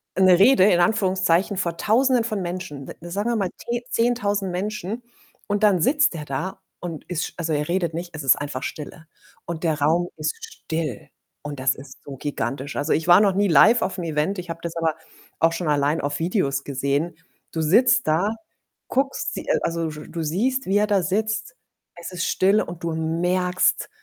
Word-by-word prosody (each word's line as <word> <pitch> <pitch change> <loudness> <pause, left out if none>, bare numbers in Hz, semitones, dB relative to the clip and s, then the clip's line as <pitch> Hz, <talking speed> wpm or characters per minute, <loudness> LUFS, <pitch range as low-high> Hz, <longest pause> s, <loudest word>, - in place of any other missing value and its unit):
'ne 185 -1 +6
Rede 200 0 +6
in 175 - +3
Anführungszeichen 185 -1 +2
vor 170 -3 -1
Tausenden 245 +5 +2
von 215 -4 -2
Menschen, 175 -6 -5
de - - -9
sagen 205 +6 -1
wir - - 0
mal 195 -4 0
te 240 0 -3
10.000 205 -5 0
Menschen, 205 +4 -3 0.5
und 205 +1 -1
dann 195 -5 +4
sitzt 285 - +3
er 155 - -5
da 145 +8 -4 0.2
und 165 -3 -6
ist 175 -3 -1
sch - - -8
also, 165 -2 -2
er 150 0 -1
redet 170 -2 0
nicht, 170 +1 -5
es 150 - -5
ist 135 -2 +5
einfach 145 -2 -4
Stille 155 +1 -7 0.4
und 170 -1 -5
der 155 -2 0
Raum 165 +4 +2
ist 155 0 -2
still 160 - -5 0.3
und 145 -2 -6
das 130 0 +2
ist 135 -1 -13
so 140 - -7
gigantisch. 135 0 -4
Also, 145 +2 +1
ich 160 - -1
war 175 - +9
noch 200 -2 +3
nie 205 +1 +3
live 225 +9 +6
auf'm 185 -2 -2
Event, 160 +5 -1
ich 180 -1 -8
habe 165 - -7
das 170 -1 -4
aber 165 -2 0 0.4
auch 165 - +4
schon 165 0 -3
allein 145 +1 +2
auf 145 +1 -2
Videos 160 -5 0
gesehen. 140 +4 -1 0.4
Du 165 - -2
sitzt 240 +9 +4
da, 165 +6 +2 0.6
guckst 270 +1 -1
sie - - -5
äh, - - +2
also, 165 -1 -1
sch 150 -1 -8
du 170 - -4
siehst, 245 - 0
wie 195 +2 +3
er 210 - +2
da 200 -2 +2
sitzt. 220 +1 -2 0.4
Es 170 - -7
ist 180 -2 -2
still 195 +3 +3
und 175 0 -7
du 165 -1 -1
merkst 180 +3 0
175 Hz, 195 wpm, -23 LUFS, 155-205 Hz, 0.6 s, war